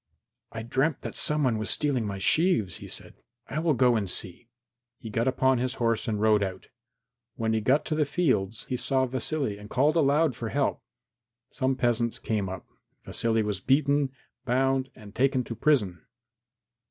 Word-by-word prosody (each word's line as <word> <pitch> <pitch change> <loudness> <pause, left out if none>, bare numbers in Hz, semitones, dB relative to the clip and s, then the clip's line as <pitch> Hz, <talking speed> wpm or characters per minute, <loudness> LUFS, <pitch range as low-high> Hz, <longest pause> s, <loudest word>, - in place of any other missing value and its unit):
"I 110 - -6
dreamt 135 +5 0
that - - -6
some 150 0 +1
one 120 -5 +1
was 110 - -3
stealing 135 -7 +1
my 100 -1 -4
sheaves," 110 - +2
he - - -9
said; - - -3 0.3
"I 150 - -3
will 160 -2 +2
go 125 -1 +4
and 100 -4 -1
see." 95 +5 -4 0.5
He 110 - -9
got 115 +3 0
upon 130 -1 +2
his 130 +1 -1
horse 115 -1 0
and 105 -2 -1
rode 110 -1 +4
out. 95 -2 -4 0.7
When 110 -1 -1
he 110 - +1
got 135 +7 +2
to - - -2
the 155 0 +2
fields 120 - 0
he 125 - -2
saw 130 +1 +1
Vasily 130 -3 -2
and 105 0 -11
called 145 +7 +2
aloud 150 -2 +3
for 115 -1 -5
help. - - 0 0.7
Some 130 -1 0
peasants 120 -2 +1
came 105 -4 -2
up. 95 -1 -7 0.4
Vasily 115 -1 +1
was 105 -3 -3
beaten, 140 +3 +2 0.3
bound 135 +1 +1
and 105 -1 -13
taken 130 +1 +2
to 115 - -6
prison. 105 -11 +1
125 Hz, 175 wpm, -27 LUFS, 110-135 Hz, 0.7 s, go